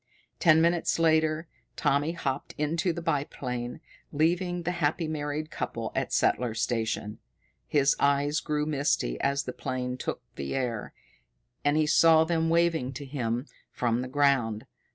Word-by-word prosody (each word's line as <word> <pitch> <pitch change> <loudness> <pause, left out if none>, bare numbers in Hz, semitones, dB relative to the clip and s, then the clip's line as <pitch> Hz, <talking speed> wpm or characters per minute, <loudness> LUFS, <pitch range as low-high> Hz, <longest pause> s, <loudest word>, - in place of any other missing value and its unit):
Ten 160 -1 +5
minutes 170 0 +2
later 160 0 +2 0.3
Tommy 145 +4 +1
hopped 140 -5 -3
into 160 +4 0
the 170 0 -6
biplane, 125 -6 -3 0.3
leaving 175 +3 +1
the 175 - -1
happy 165 -1 0
married 155 0 -3
couple - - -4
at - - -2
Settler's 115 -3 +1
Station. 110 -2 -2 0.5
His 140 -2 +3
eyes 140 +2 +2
grew 150 0 -1
misty 140 - 0
as 140 0 +1
the 125 - -5
plane 125 0 -3
took - - -4
the 70 0 -3
air, 120 -5 -2 0.7
and 145 +1 +2
he 155 - +3
saw 160 +1 +6
them 165 0 0
waving 165 -6 +2
to 140 +2 -7
him 125 -2 -2 0.3
from 120 0 0
the 130 - -4
ground. 130 -6 +1
145 Hz, 145 wpm, -28 LUFS, 125-160 Hz, 0.7 s, saw